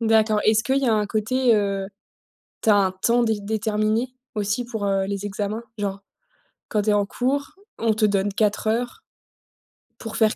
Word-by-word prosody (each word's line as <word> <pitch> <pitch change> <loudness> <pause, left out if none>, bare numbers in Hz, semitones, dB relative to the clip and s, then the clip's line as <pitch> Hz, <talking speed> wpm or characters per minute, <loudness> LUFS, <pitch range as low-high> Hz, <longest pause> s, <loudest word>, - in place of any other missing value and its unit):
D'accord. 220 -1 +3
Est-ce 220 +1 +4
qu'il 265 +3 +2
y 275 - 0
a 225 - +4
un 210 -1 +1
côté, 235 +4 +2
heu, 200 -2 0 0.8
tu - - +1
as 210 - +7
un 195 -2 +3
temps 235 +6 +2
dé 220 -1 +2
déterminé 215 +3 0 0.3
aussi 210 +3 -1
pour, 220 -4 -4
heu, 195 -1 +1
les 200 0 -3
examens? 205 +2 -3
Genre, 200 -1 -3 0.7
quand 210 -2 +1
tu 210 - +1
es - - +4
en 205 -1 +2
cours, 275 +6 -1 0.3
on 225 -1 +2
te 215 0 +1
donne 200 0 +1
4 210 +1 0
heures 240 - -1 1.0
pour 225 -1 -7
faire 220 -1 +3
215 Hz, 185 wpm, -23 LUFS, 205-230 Hz, 1.0 s, as